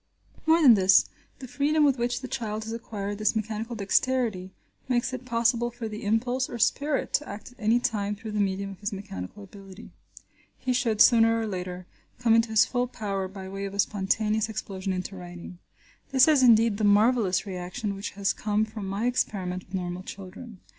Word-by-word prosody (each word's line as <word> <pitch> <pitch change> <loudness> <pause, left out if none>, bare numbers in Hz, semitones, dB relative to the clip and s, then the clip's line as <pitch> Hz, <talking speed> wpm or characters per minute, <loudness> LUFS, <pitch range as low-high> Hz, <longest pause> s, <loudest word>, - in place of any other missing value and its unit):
More 325 +1 +5
than 255 -5 +9
this, 190 -2 +5 0.3
the 260 - -9
freedom 285 +5 +1
with 275 -3 +3
which 245 +1 -1
the 260 - -6
child 220 -5 -4
has 225 +1 -6
acquired 205 -3 -5
this 215 +1 +1
mechanical 220 +2 -3
dexterity 215 -2 0 0.4
makes 250 0 0
it 255 0 -6
possible 235 0 +1
for 240 -1 -6
the 215 0 -7
impulse 245 +5 0
or 240 - -5
spirit 280 +5 0
to 295 - 0
act 210 +4 -8
at 250 - -23
any 225 +2 +3
time 210 -4 -1
through 220 +1 -8
the 210 - -2
medium 195 0 -1
of 195 - -12
his 205 +1 -3
mechanical 195 - -7
ability. 195 +1 -13 0.7
He 255 - -1
should, 230 -4 +1
sooner 230 -1 +6
or 225 - -2
later, 180 -2 -5 0.3
come 235 -2 +3
into 230 0 +3
his 220 -1 +5
full 245 -1 -1
power 200 -5 -3
by 190 0 -9
way 195 +1 -6
of 200 0 -6
a - - -8
spontaneous 210 +2 +1
explosion 195 -3 -4
into 185 +1 -4
writing. 175 -1 -10 0.5
This 265 0 +5
is, 300 -4 +5
indeed, 230 -3 +5
the 215 - -2
marvellous 205 -1 +3
reaction 195 +3 -4
which 195 - -6
has 200 -1 +1
come 210 0 0
from 215 -2 -7
my 200 +4 -2
experiment 185 -7 -1
with 185 - -8
normal 180 -1 -3
children. 195 +3 -10
215 Hz, 195 wpm, -26 LUFS, 195-240 Hz, 0.7 s, than